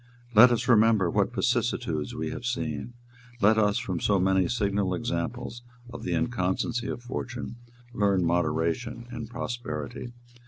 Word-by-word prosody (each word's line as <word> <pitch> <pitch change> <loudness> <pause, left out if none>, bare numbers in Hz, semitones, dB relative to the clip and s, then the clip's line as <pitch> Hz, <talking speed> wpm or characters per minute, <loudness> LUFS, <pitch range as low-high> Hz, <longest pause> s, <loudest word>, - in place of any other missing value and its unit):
"Let 115 +3 +9
us 120 - 0
remember 110 -6 +4
what - - +1
vicissitudes 75 -2 0
we 80 0 -3
have - - -6
seen. 120 0 -3 0.5
Let 110 +1 +5
us, 105 -1 +3
from 90 -3 -2
so 100 -2 +2
many 95 0 +3
signal 100 -4 0
examples 120 +9 -3 0.3
of 120 - -8
the 90 - -1
inconstancy 100 +6 -1
of 120 - -5
fortune, 120 -1 -5 0.4
learn 100 -5 +2
moderation 85 +8 0
in 115 -2 -5
prosperity. 120 0 -5
105 Hz, 135 wpm, -27 LUFS, 90-120 Hz, 0.5 s, Let